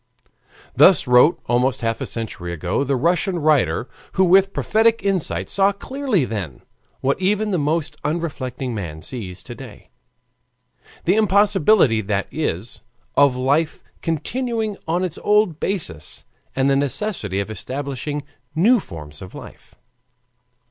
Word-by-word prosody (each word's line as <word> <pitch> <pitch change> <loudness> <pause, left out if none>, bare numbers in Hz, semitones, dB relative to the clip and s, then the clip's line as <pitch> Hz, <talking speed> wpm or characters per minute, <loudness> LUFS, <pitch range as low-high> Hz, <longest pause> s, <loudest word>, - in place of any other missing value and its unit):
Thus 185 -6 +6
wrote 125 +6 +5
almost 125 +2 +1
half 115 -1 -1
a - - -2
century 105 -6 -5
ago 85 - -1
the 140 0 0
Russian 175 +7 +1
writer, 150 -5 +2 0.3
who 190 - +3
with 190 +2 +5
prophetic 225 +3 +2
insight 195 -4 0
saw 195 0 +3
clearly 230 - -1
then, 95 - -5 0.4
what 140 +7 0
even 210 +3 +1
the 180 - +1
most 155 +1 -1
unreflecting 140 -5 -3
man 80 -7 -6
sees 95 -8 -7
to 120 - -8
day, 120 -4 -12 1.1
the 180 - +4
impossibility, 200 - +4
that 100 -1 -1
is, 120 - -3 0.3
of 140 -3 +5
life 140 +5 +1 0.2
continuing 220 - -2
on 175 +3 0
its 180 -3 -3
old 210 -6 +2
basis, 85 - -4 0.3
and 135 0 +2
the 140 - +3
necessity 135 - -1
of 100 +2 -3
establishing 140 +4 -4 0.3
new 225 +10 +5
forms 75 - -9
of 90 - -10
life. - - -12
145 Hz, 135 wpm, -21 LUFS, 120-190 Hz, 1.1 s, Thus